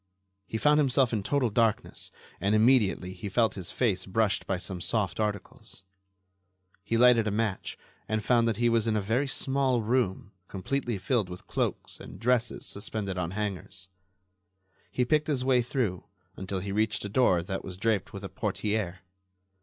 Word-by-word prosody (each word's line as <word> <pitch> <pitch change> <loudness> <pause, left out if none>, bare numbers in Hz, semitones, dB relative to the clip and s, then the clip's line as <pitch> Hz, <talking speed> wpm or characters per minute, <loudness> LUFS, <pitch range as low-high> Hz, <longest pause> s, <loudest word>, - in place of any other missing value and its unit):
He 110 - -3
found 150 +5 +4
himself 130 -3 +3
in 110 - 0
total 125 +2 +1
darkness 115 -1 0 0.3
and 100 +2 +2
immediately 110 -5 +3
he 95 +2 -6
felt 110 +1 +2
his 95 -3 -6
face 100 -7 0
brushed 105 +1 +1
by 95 - 0
some 90 0 -5
soft 95 -2 -1
articles. 105 -2 -4 1.0
He 115 +3 0
lighted 120 -2 +6
a - - +2
match 105 -2 -2 0.3
and 110 -1 0
found 120 -2 +4
that 115 - 0
he 120 0 +2
was 115 -1 +2
in 110 - +1
a - - +2
very 115 +8 0
small 135 -3 +1
room 105 -4 0 0.2
completely 120 +4 -2
filled 100 +1 0
with 90 0 -9
cloaks - - -2
and - - -10
dresses 120 0 +1
suspended 100 -2 -4
on 85 -2 -1
hangers. 95 -1 -5 1.0
He 125 - 0
picked 150 +3 +2
his 135 -4 0
way 130 -2 +4
through 120 -7 -2 0.3
until 95 0 -4
he 100 +1 -4
reached 110 +1 0
a - - -1
door 100 -7 +3
that 95 +2 -4
was 90 -1 -7
draped 110 +3 0
with 100 -2 -8
a 95 - -5
portiere. 100 -1 -2
110 Hz, 170 wpm, -28 LUFS, 95-120 Hz, 1.0 s, lighted